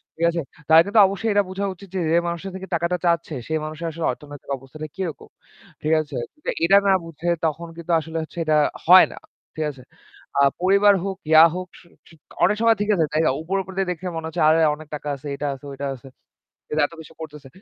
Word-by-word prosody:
ঠিক 165 Hz, -, -12 dB
আছে? 170 Hz, 0 st, -2 dB, 0.3 s
তাদের 160 Hz, +1 st, +8 dB
কিন্তু 210 Hz, +2 st, +3 dB
অবশ্যই 210 Hz, +3 st, -2 dB
এটা 205 Hz, 0 st, +3 dB
বোঝা 195 Hz, +2 st, -3 dB
উচিত 195 Hz, +1 st, -14 dB
যে, -, -, 0 dB
যে 170 Hz, -, +4 dB
মানুষের 170 Hz, +3 st, -4 dB
থেকে 190 Hz, 0 st, -7 dB
টাকাটা 170 Hz, +2 st, 0 dB
চাচ্ছে 170 Hz, -3 st, 0 dB
সে 160 Hz, -, -3 dB
মানুষের 160 Hz, +1 st, -4 dB
অর্থনৈতিক 145 Hz, -2 st, -11 dB
অবস্থাটা 135 Hz, +4 st, -9 dB
কিরকম, 180 Hz, -7 st, -5 dB, 0.5 s
ঠিক 155 Hz, +1 st, +2 dB
আছে? 150 Hz, -, -9 dB, 0.2 s
কিন্তু 300 Hz, -, -7 dB, 0.2 s
এটা 195 Hz, +4 st, +6 dB
না 195 Hz, -, +5 dB
বুঝে 165 Hz, +1 st, -5 dB, 0.2 s
তখন 165 Hz, +2 st, -2 dB
কিন্তু 170 Hz, +1 st, -5 dB
আসলে 160 Hz, +1 st, -6 dB, 0.3 s
এটা 155 Hz, -1 st, +2 dB, 0.3 s
হয় 185 Hz, +2 st, +9 dB
না, -, -, -13 dB, 0.4 s
ঠিক 155 Hz, -, -2 dB
আছে? 130 Hz, -3 st, -15 dB, 0.6 s
আ -, -, +5 dB, 0.2 s
পরিবার 200 Hz, +2 st, +5 dB
হোক, 195 Hz, -1 st, -3 dB
ইয়া 160 Hz, +1 st, +9 dB
হোক, 185 Hz, 0 st, -5 dB
স -, -, -21 dB, 0.3 s
স -, -, -19 dB, 0.3 s
অনেক 210 Hz, -, +4 dB
সময় 230 Hz, 0 st, +5 dB
ঠিক 210 Hz, -, -1 dB
আছে, 160 Hz, -3 st, +2 dB
তাই 155 Hz, -, +2 dB
না? 155 Hz, -, +3 dB
উপর, 185 Hz, +5 st, -3 dB
উপর 190 Hz, -, -11 dB
দিয়ে 195 Hz, -2 st, 0 dB
দেখে 180 Hz, +1 st, -5 dB
মনে 160 Hz, 0 st, -4 dB
হচ্ছে 160 Hz, -, -3 dB
আরে 160 Hz, +1 st, +4 dB, 0.2 s
অনেক 155 Hz, 0 st, -13 dB
টাকা 150 Hz, -, -8 dB
আছে, 140 Hz, +2 st, -10 dB
এটা 145 Hz, -, -3 dB
আছে 140 Hz, -, -15 dB
ওইটা 140 Hz, +1 st, -4 dB
আছে। 130 Hz, +2 st, -14 dB, 0.6 s
ফের 150 Hz, -, -1 dB
এত -, -, -18 dB
কিছু 160 Hz, -, -14 dB
করতেছে। 150 Hz, -3 st, -9 dB
165 Hz, 220 wpm, -22 LUFS, 155-190 Hz, 0.6 s, হয়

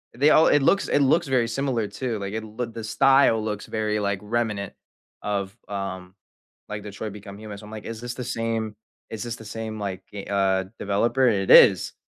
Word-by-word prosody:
they 145 Hz, +4 st, +4 dB
all 160 Hz, -, +6 dB
it 145 Hz, -2 st, +4 dB
looks 200 Hz, -, +3 dB
it -, -, +2 dB
looks 145 Hz, +3 st, +3 dB
very 125 Hz, -3 st, +2 dB
similar 120 Hz, -3 st, -1 dB
too, 115 Hz, +2 st, -4 dB
like 100 Hz, 0 st, -5 dB
it 110 Hz, 0 st, -3 dB
loo 110 Hz, +3 st, -4 dB
the 115 Hz, -1 st, -8 dB
style 135 Hz, -1 st, +4 dB
looks 105 Hz, -1 st, -4 dB
very, 105 Hz, -1 st, -1 dB
like 100 Hz, -1 st, 0 dB
remnant, 105 Hz, -3 st, -2 dB, 0.5 s
of, 100 Hz, -1 st, -3 dB
um, 95 Hz, -2 st, -5 dB, 0.5 s
like 105 Hz, 0 st, -5 dB
Detroit: 105 Hz, 0 st, -7 dB
Become 100 Hz, -1 st, -10 dB
Human, 105 Hz, -2 st, -8 dB
so 105 Hz, -, -12 dB
I'm 105 Hz, -, -11 dB
like 110 Hz, -1 st, -8 dB
is 115 Hz, -1 st, -5 dB
this 120 Hz, 0 st, -4 dB
the 125 Hz, 0 st, -6 dB
same 115 Hz, -3 st, -2 dB, 0.3 s
is 110 Hz, -2 st, -6 dB
this 120 Hz, -1 st, -4 dB
the 110 Hz, -, -12 dB
same, 110 Hz, 0 st, -5 dB
like, 95 Hz, -2 st, -4 dB
ga 100 Hz, -1 st, -7 dB
uh, 95 Hz, -1 st, +1 dB
developer, 115 Hz, +6 st, +1 dB
it 95 Hz, -4 st, 0 dB
is. -, -, +7 dB
110 Hz, 205 wpm, -24 LUFS, 100-120 Hz, 0.5 s, is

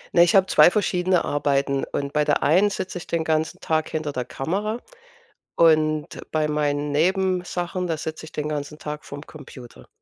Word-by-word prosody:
Ne, 170 Hz, -, +7 dB
ich 175 Hz, -, +3 dB
hab 190 Hz, -1 st, +5 dB
2 -, -, +7 dB
verschiedene 185 Hz, -3 st, +1 dB
Arbeiten. 140 Hz, -1 st, 0 dB
Und 140 Hz, 0 st, -3 dB
bei 150 Hz, -, +2 dB
der -, -, +1 dB
einen 185 Hz, +7 st, +4 dB
sitze 185 Hz, -2 st, -4 dB
ich -, -, -11 dB
den 170 Hz, -1 st, -1 dB
ganzen 160 Hz, 0 st, -1 dB
Tag 160 Hz, -1 st, 0 dB
hinter 155 Hz, -2 st, -3 dB
der 125 Hz, -3 st, -3 dB
Kamera 195 Hz, -, -3 dB, 0.8 s
und 155 Hz, -2 st, +3 dB, 0.2 s
bei 155 Hz, -1 st, +1 dB
meinen 145 Hz, -1 st, -1 dB
Nebensachen, 180 Hz, +1 st, 0 dB
da 165 Hz, -3 st, -2 dB
sitze 155 Hz, +1 st, -6 dB
ich -, -, -13 dB
den 150 Hz, 0 st, -3 dB
ganzen 150 Hz, 0 st, -5 dB
Tag 150 Hz, 0 st, -6 dB
vorm 145 Hz, +1 st, -9 dB
Computer. 125 Hz, -, -13 dB
155 Hz, 180 wpm, -23 LUFS, 145-180 Hz, 0.8 s, Ne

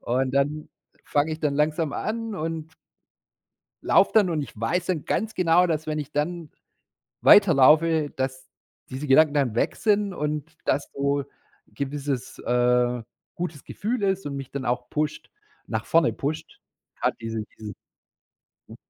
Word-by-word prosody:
und 130 Hz, +2 st, 0 dB
dann 145 Hz, +2 st, 0 dB, 0.4 s
fange 150 Hz, +2 st, +1 dB
ich 155 Hz, -, -6 dB
dann 145 Hz, -2 st, 0 dB
langsam 150 Hz, 0 st, 0 dB
an 225 Hz, 0 st, -3 dB
und 160 Hz, -1 st, -4 dB, 1.1 s
laufe -, -, +4 dB
dann 210 Hz, -4 st, +5 dB
und 155 Hz, -3 st, -1 dB
ich 120 Hz, -, -10 dB
weiß 175 Hz, +11 st, -1 dB
dann 170 Hz, -5 st, -1 dB
ganz 220 Hz, 0 st, -1 dB
genau, 180 Hz, 0 st, +4 dB
dass 160 Hz, -2 st, -2 dB
wenn 155 Hz, -1 st, -2 dB
ich 145 Hz, 0 st, -6 dB
dann 160 Hz, +1 st, -2 dB, 0.7 s
weiterlaufe, 160 Hz, -4 st, +6 dB
dass 130 Hz, -1 st, -4 dB, 0.4 s
diese 135 Hz, +3 st, -5 dB
Gedanken 145 Hz, +2 st, +5 dB
dann 135 Hz, -6 st, +1 dB
weg -, -, 0 dB
sind 205 Hz, -3 st, +1 dB
und, 150 Hz, +1 st, -4 dB
dass 140 Hz, -, 0 dB
so 140 Hz, 0 st, 0 dB, 0.4 s
gewisses, 140 Hz, -2 st, -4 dB
äh, 125 Hz, 0 st, +1 dB, 0.3 s
gutes 165 Hz, -5 st, -5 dB
Gefühl 225 Hz, +2 st, -3 dB
ist 195 Hz, -2 st, 0 dB
und 140 Hz, -1 st, -4 dB
mich 135 Hz, -1 st, -7 dB
dann 140 Hz, -2 st, -4 dB
auch 125 Hz, 0 st, -2 dB
pusht 150 Hz, 0 st, -2 dB, 0.4 s
nach -, -, -3 dB
vorne 165 Hz, -1 st, +3 dB
pusht, 155 Hz, +3 st, -5 dB, 0.4 s
grad -, -, +1 dB
diese 115 Hz, -1 st, -3 dB
diese 105 Hz, -2 st, -7 dB, 0.9 s
Hm. -, -, -11 dB
150 Hz, 150 wpm, -25 LUFS, 135-165 Hz, 1.1 s, weiterlaufe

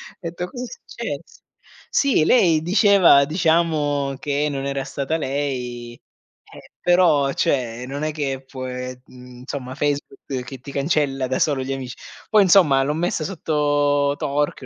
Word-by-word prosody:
ho -, -, -48 dB
detto: 175 Hz, 0 st, -5 dB
"Cosa 250 Hz, -1 st, -6 dB
è -, -, -5 dB, 0.2 s
successo?" -, -, -7 dB, 0.5 s
Sì, 275 Hz, -, +2 dB
lei 165 Hz, -7 st, +4 dB
diceva 185 Hz, -5 st, +5 dB
diciamo 155 Hz, -4 st, +1 dB
che 145 Hz, +1 st, -1 dB
non 135 Hz, -1 st, -4 dB
era 140 Hz, -1 st, -2 dB
stata 140 Hz, +3 st, -2 dB
lei. 125 Hz, -5 st, -4 dB, 0.5 s
Eh, -, -, -14 dB
però, 165 Hz, -6 st, +3 dB
cioè, 125 Hz, -3 st, -1 dB
non 140 Hz, +3 st, -5 dB
è 155 Hz, -, -1 dB
che 135 Hz, -3 st, -3 dB
può 130 Hz, -1 st, -7 dB
e 125 Hz, 0 st, -6 dB
mhmm, 125 Hz, -1 st, -14 dB
insomma 130 Hz, 0 st, -6 dB
Facebook 145 Hz, 0 st, -2 dB, 0.3 s
che 135 Hz, +1 st, -8 dB
ti 135 Hz, +3 st, -10 dB
cancella 140 Hz, -2 st, 0 dB
da 130 Hz, -, -1 dB
solo 140 Hz, -4 st, +1 dB
gli 135 Hz, -, -4 dB
amici. 130 Hz, -2 st, -6 dB, 0.3 s
Poi 215 Hz, -2 st, +5 dB
insomma 170 Hz, -8 st, +5 dB
l'ho 145 Hz, +2 st, -1 dB
messa 165 Hz, -1 st, -1 dB
sotto 145 Hz, -4 st, +1 dB
torchio 145 Hz, -2 st, -2 dB
145 Hz, 155 wpm, -22 LUFS, 135-160 Hz, 0.5 s, diceva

